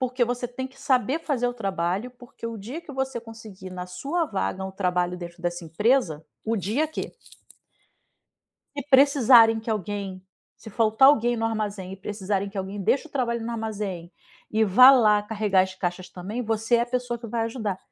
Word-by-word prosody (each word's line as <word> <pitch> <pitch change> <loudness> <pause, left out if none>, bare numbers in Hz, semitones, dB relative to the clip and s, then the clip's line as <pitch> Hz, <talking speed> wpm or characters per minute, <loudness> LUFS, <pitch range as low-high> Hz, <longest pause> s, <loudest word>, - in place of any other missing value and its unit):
"Porque 255 -1 +1
você 245 0 -3
tem 260 +1 -5
que 265 +1 -18
saber 265 +2 +1
fazer 260 -6 -1
o 245 - -1
trabalho, 195 0 -2
porque 245 -1 -10
o 230 -1 -5
dia 240 +11 -7
que 325 - -12
você 265 -3 -3
conseguir 220 -5 -11
na 180 0 -6
sua 280 - -2
vaga 190 -5 -3
um 190 - -5
trabalho 180 -2 -1
dentro 175 0 -9
dessa 175 0 -2
empresa, 165 - +1 0.2
o 225 +1 -1
dia 225 - 0
que" 315 - -5 1.6
"se 285 - -2
precisarem 255 -5 +6
que 220 - -9
alguém, 200 -2 -4 0.3
se 220 - -12
faltar 225 +5 +4
alguém 240 -4 +3
no 225 - -2
armazém 205 -4 -3
e - - -7
precisarem 200 0 -3
que 200 - -12
alguém 195 +2 -4
deixe 280 - +1
o - - -31
trabalho 235 -4 -1
no 235 - -4
armazém 210 -6 -5 0.4
e 220 +1 +2
vá 250 +7 +8
lá 215 -5 +5
carregar 210 -3 +1
as 190 0 -4
caixas 180 0 -4
também, 205 +7 -5
você 225 +1 +1
é - - +2
a - - -2
pessoa 245 -1 -2
que 235 - -8
vai 230 +1 -2
ajudar". 220 -5 -3
220 Hz, 190 wpm, -25 LUFS, 190-245 Hz, 1.6 s, vá